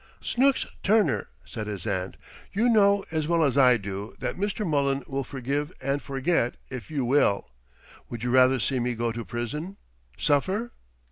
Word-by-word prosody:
"Snooks 270 +2 +2 0.2
Turner!" 215 +1 +2 0.2
said 110 -3 -6
his 100 -4 -5
aunt. 95 -3 -2 0.3
"You 225 +5 +2
know 200 -3 +4
as 155 -2 -1
well 170 -1 +3
as 140 -4 +2
I 125 -3 +6
do 100 0 -6
that - - -3
Mr. 205 +2 -2
Mullen 140 -4 +1
will 135 0 -2
forgive 140 +4 -3
and 140 +1 -1
forget, 135 -2 0
if 125 -3 -7
you 145 -5 -1
will. 120 - +2 0.6
Would 120 -1 -6
you 125 - 0
rather 130 +1 +5
see 130 +4 0
me 120 0 -1
go 115 0 -1
to 115 +1 -5
prison 150 - -5 0.4
suffer?" 190 - +1
135 Hz, 165 wpm, -26 LUFS, 120-170 Hz, 0.6 s, I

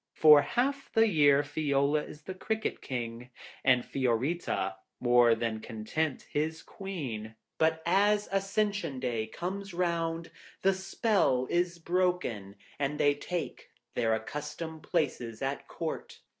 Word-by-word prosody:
For 150 -2 +8
half 275 - -1
the 225 -1 +5
year 145 -6 +5
Fiola 145 0 +1
is 150 - -12
the 190 - -5
Cricket 220 +4 -2
King, 120 -1 -5 0.3
and 125 -2 +4
Fiorita, 125 - -1 0.2
more 120 -1 +5
than 115 -1 -2
content, 125 +7 -3
his 160 +2 -1
Queen. 130 - -6 0.2
But 160 0 +2
as 205 +4 +3
Ascension 195 -6 0
day 115 -4 -1
comes 190 - -5
round, 170 -2 -1 0.3
the 195 - +5
spell 190 - +1
is 175 0 +1
broken, 170 - -1 0.2
and 145 +1 -1
they 145 0 +5
take 170 +4 -5 0.2
their 115 -2 +2
accustomed 150 +7 -5
places 120 -7 -2
at 135 +1 -1
the - - -20
Court. 165 -1 -5
150 Hz, 130 wpm, -30 LUFS, 125-180 Hz, 0.3 s, For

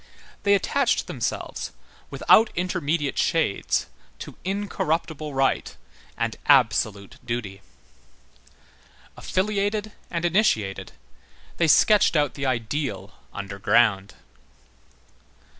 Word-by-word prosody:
They 200 0 +4
attached 255 +6 +1
themselves, - - -4 0.4
without 225 +1 +4
intermediate 160 -4 -1
shades, 160 - 0 0.3
to - - -9
incorruptible 165 -6 -2
right 135 0 0 0.4
and 115 -1 -2
absolute 110 -7 +2
duty. 110 -5 -5 1.5
Affiliated 205 +2 -1 0.2
and 170 0 -2
initiated, 165 - 0 0.6
they 170 - +2
sketched 205 +5 +5
out 145 -3 +2
the 135 -1 -3
ideal 130 +3 -3 0.2
underground. 100 +1 +1
150 Hz, 80 wpm, -24 LUFS, 115-190 Hz, 1.5 s, sketched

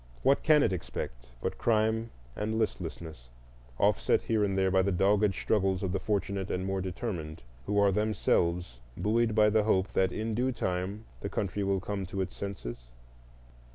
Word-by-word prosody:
What 135 +2 +4
can 150 -2 +5
it - - +2
expect - - -6
but - - -2
crime 110 0 +1 0.3
and 110 +1 -2
listlessness, 80 - -4 0.5
offset - - +2
here 110 -2 +1
and 95 -1 0
there 95 0 +2
by 95 0 +4
the 100 +1 +1
dogged 100 +2 +3
struggles 95 -1 +1
of 95 - -1
the 95 - 0
fortunate 100 -1 -1
and 90 +1 -2
more 95 0 -1
determined 90 - -5 0.2
who 105 +1 0
are 100 -1 +5
themselves 90 - 0 0.2
buoyed 115 +1 +1
by 105 -1 +5
the 110 0 +4
hope 95 -3 +2
that 95 -1 +1
in 110 +1 -2
due 125 +4 +1
time 95 0 -3
the 100 - -4
country 100 0 -2
will 100 0 +1
come 100 0 -4
to 95 - -5
its 95 - -4
senses? - - -6
100 Hz, 175 wpm, -30 LUFS, 95-110 Hz, 0.5 s, can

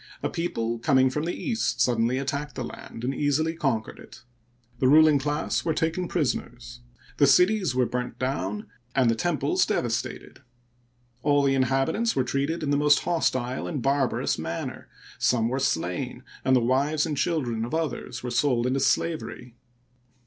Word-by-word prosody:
A - - -1
people 115 -9 -2
coming 130 +1 +3
from 150 +3 -2
the 175 - -2
east 230 -3 -2
suddenly 120 +1 +2
attacked 140 +2 -3
the 130 - -3
land 115 0 -9
and 130 +2 -1
easily 150 +3 0
conquered 135 -10 -2
it. 120 - -14 0.6
The 130 - +3
ruling 155 +1 +6
class 150 +3 -1
were 160 -2 0
taken 165 +2 -1
prisoners, 125 -7 -3 0.4
the 140 - +5
cities 180 +1 +4
were 125 -1 +3
burned 125 +1 -4
down, 105 -6 -2 0.3
and 130 -4 +4
the - - 0
temples 175 - +1
devastated. - - -3 0.8
All 145 +1 +3
the 135 -1 +3
inhabitants 135 - +1
were 130 - +2
treated 140 +6 -2
in 145 - -1
the 145 - +3
most 145 0 +4
hostile 130 -7 -1
and 150 - -3
barbarous 135 - +1
manner; 80 +1 -5 0.3
some 115 -2 +2
were 130 +2 -1
slain, 90 -8 -2 0.2
and 130 - +3
the 125 - +4
wives 140 +6 +1
and 155 -2 -2
children 130 -8 -1
of 120 +7 -3
others 150 -7 -3
were 125 - -3
sold 120 -1 +1
into 130 +2 +1
slavery. 130 -2 -1
135 Hz, 165 wpm, -26 LUFS, 125-155 Hz, 0.8 s, ruling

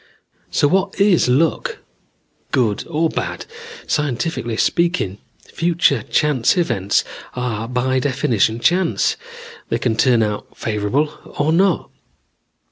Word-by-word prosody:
"So 145 - +2
what 190 +4 0
is 200 -7 +4
luck, 145 +6 +1 0.7
good 115 -6 +1
or 165 0 +1
bad? - - -4 0.4
Scientifically 135 -4 -1
speaking, 170 - 0 0.3
future 165 -7 +2
chance 145 - +1
events 100 - +1 0.3
are 115 -3 -3
by 130 +1 0
definition 125 -5 +1
chance. 175 +6 +2 0.5
They - - +1
can 115 -3 0
turn 120 -1 +3
out 105 -1 -4
favorable 110 +8 -2
or 150 +2 +2
not. 185 0 +2
130 Hz, 110 wpm, -19 LUFS, 115-165 Hz, 0.7 s, is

